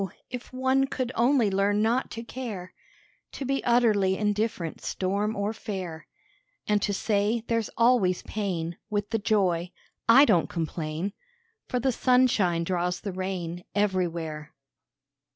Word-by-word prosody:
if 250 Hz, -1 st, -7 dB
one 260 Hz, +1 st, +2 dB
could 255 Hz, -2 st, -3 dB
only 240 Hz, -3 st, +3 dB
learn 200 Hz, +2 st, +2 dB
not 230 Hz, +4 st, +1 dB
to 230 Hz, -, -6 dB
care, 220 Hz, -8 st, -6 dB, 0.6 s
To 275 Hz, -, -5 dB
be 275 Hz, +1 st, -1 dB
utterly 215 Hz, -6 st, +3 dB
indifferent 210 Hz, -5 st, -1 dB
storm 200 Hz, +3 st, -1 dB
or 205 Hz, +2 st, -1 dB
fair; 185 Hz, -7 st, -6 dB, 0.6 s
And 210 Hz, -1 st, +2 dB
to 205 Hz, -, 0 dB
say 210 Hz, +3 st, 0 dB
there's 230 Hz, -2 st, 0 dB
always 230 Hz, -7 st, +3 dB
pain 175 Hz, -5 st, -3 dB
With 205 Hz, -1 st, -2 dB
the 225 Hz, -, +1 dB
joy, 185 Hz, -5 st, +1 dB, 0.4 s
I 265 Hz, +5 st, +9 dB
don't 175 Hz, -, +3 dB
complain, 165 Hz, +2 st, -3 dB, 0.5 s
For 250 Hz, -, -1 dB
the 265 Hz, +2 st, +1 dB
sunshine 235 Hz, -10 st, +3 dB
draws 180 Hz, 0 st, -1 dB
the 200 Hz, -3 st, -4 dB
rain 180 Hz, -2 st, -4 dB
Everywhere. 170 Hz, -6 st, -1 dB
205 Hz, 135 wpm, -27 LUFS, 180-230 Hz, 0.6 s, I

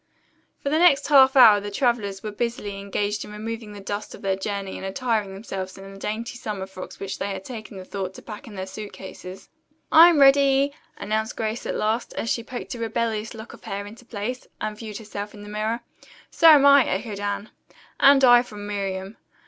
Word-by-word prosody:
For 280 Hz, -, 0 dB
the 310 Hz, -, +2 dB
next 335 Hz, -6 st, +4 dB
half 265 Hz, -2 st, +7 dB
hour 220 Hz, -6 st, +8 dB
the 205 Hz, 0 st, -6 dB
travelers 205 Hz, -3 st, -1 dB
were 215 Hz, -, -4 dB
busily 210 Hz, -2 st, -3 dB
engaged 205 Hz, +1 st, -2 dB
in 210 Hz, -, -10 dB
removing 220 Hz, +1 st, -6 dB
the 205 Hz, -, -9 dB
dust 205 Hz, +1 st, -5 dB
of -, -, -15 dB
their 195 Hz, -1 st, +1 dB
journey 195 Hz, 0 st, -4 dB
and -, -, -7 dB
attiring 215 Hz, 0 st, -1 dB
themselves 195 Hz, -2 st, -6 dB
in 195 Hz, 0 st, -10 dB
the 195 Hz, -, -12 dB
dainty 230 Hz, +4 st, -4 dB
summer 205 Hz, -5 st, -4 dB
frocks 190 Hz, -1 st, -10 dB
which 195 Hz, -1 st, -5 dB
they 195 Hz, -, -2 dB
had 190 Hz, -1 st, -6 dB
taken 215 Hz, -6 st, -8 dB
thought 190 Hz, -1 st, -5 dB
to -, -, -11 dB
pack 220 Hz, +4 st, -9 dB
in 215 Hz, -, -10 dB
their 190 Hz, -1 st, -4 dB
suit 205 Hz, +2 st, -8 dB
cases. 190 Hz, 0 st, -10 dB, 0.4 s
"I'm 330 Hz, -1 st, +8 dB
ready," 275 Hz, 0 st, +5 dB, 0.2 s
announced 220 Hz, +2 st, -2 dB
Grace 220 Hz, +1 st, -3 dB
at -, -, -2 dB
last, 220 Hz, +3 st, -1 dB
as 230 Hz, -, -2 dB
she 230 Hz, -, -1 dB
poked 245 Hz, +2 st, -6 dB
a 240 Hz, -, -7 dB
rebellious 225 Hz, -1 st, -2 dB
lock 220 Hz, +1 st, -10 dB
of -, -, -15 dB
hair 200 Hz, +1 st, -4 dB
into 220 Hz, +4 st, -12 dB
place, 240 Hz, +2 st, -5 dB
and 215 Hz, 0 st, -3 dB
viewed 215 Hz, -1 st, -7 dB
herself 210 Hz, -1 st, -7 dB
in 205 Hz, -, -11 dB
the 205 Hz, -, -10 dB
mirror. 215 Hz, +3 st, -2 dB, 0.5 s
"So 330 Hz, -, +4 dB
am 290 Hz, -3 st, +8 dB
I," 280 Hz, -1 st, +8 dB
echoed 210 Hz, -4 st, -3 dB
Anne. 205 Hz, +1 st, -3 dB, 0.5 s
"And 275 Hz, 0 st, +6 dB
I," 245 Hz, -1 st, +8 dB
from 210 Hz, -4 st, -9 dB
Miriam. 195 Hz, 0 st, -4 dB
215 Hz, 205 wpm, -24 LUFS, 200-240 Hz, 0.5 s, hour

